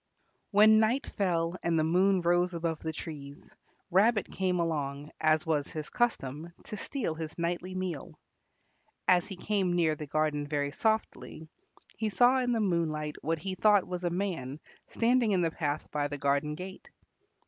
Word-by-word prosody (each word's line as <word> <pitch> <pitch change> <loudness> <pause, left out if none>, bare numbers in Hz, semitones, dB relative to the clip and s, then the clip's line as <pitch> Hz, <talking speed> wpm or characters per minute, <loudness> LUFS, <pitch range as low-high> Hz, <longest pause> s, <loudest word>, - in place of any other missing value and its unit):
When 215 +1 +6
night 230 +5 +2
fell 175 -3 -1
and 170 -1 +1
the 155 - +3
moon 185 +4 +3
rose 175 +1 +2
above 165 -2 -2
the 160 - -3
trees, 145 -3 -9 0.4
Rabbit 205 +3 +3
came 185 -2 0
along, 145 -3 -2
as 155 +1 +3
was 155 -3 0
his 155 -1 -7
custom, 165 - -1
to - - -7
steal 215 - -3
his 160 0 -7
nightly 175 +2 -2
meal. 180 -6 -4 0.9
As 180 -1 +4
he 195 - -6
came 190 -1 0
near 165 -3 +3
the 150 0 -7
garden 150 0 0
very 145 -1 -1
softly, 220 -5 -2 0.5
he 220 -1 -1
saw 245 +5 +4
in 250 -1 0
the 230 - +1
moonlight 160 -6 -1
what 165 +2 -1
he 185 +5 -4
thought 205 0 +4
was 180 0 -5
a 175 - +1
man 170 -7 -3 0.3
standing 235 -2 +2
in 185 - +2
the 165 -1 +1
path 150 -2 -2
by 145 -1 0
the 145 0 -5
garden 140 +2 0
gate. 185 +3 -9
170 Hz, 170 wpm, -30 LUFS, 155-195 Hz, 0.9 s, When